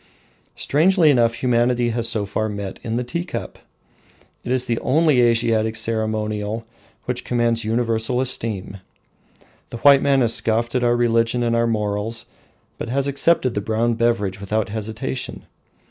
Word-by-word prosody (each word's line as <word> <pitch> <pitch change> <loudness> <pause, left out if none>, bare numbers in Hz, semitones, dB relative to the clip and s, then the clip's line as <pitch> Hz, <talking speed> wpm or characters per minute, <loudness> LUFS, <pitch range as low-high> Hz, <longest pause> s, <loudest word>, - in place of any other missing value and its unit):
Strangely 165 +1 +3
enough 115 -3 +2
humanity 120 0 +2
has 115 0 -1
so 110 -4 -1
far 110 +2 -2
met 100 -2 -6
in 115 -1 -3
the 125 - -1
tea 170 +8 -3
cup. 180 - -6 0.8
It 125 - -4
is 130 -1 +2
the 115 -2 -1
only 150 -1 +3
Asiatic 115 -2 +2
ceremonial 110 -1 -2 0.4
which 125 0 -3
commands 120 -1 0
universal 115 +2 0
esteem. 110 -7 -2 0.9
The - - -6
white 140 +2 +6
man 140 -1 +3
has 115 -2 +2
scoffed 115 +1 0
at 125 -1 0
our 120 0 +3
religion 115 0 +1
and 115 0 +1
our 115 0 +2
morals, 105 +1 -2 0.5
but 115 - -5
has 135 +2 0
accepted 140 -2 +2
the 105 - -2
brown 110 +3 0
beverage 115 -5 0
without 105 +1 -1
hesitation. 110 +5 -5
115 Hz, 150 wpm, -21 LUFS, 110-125 Hz, 0.9 s, white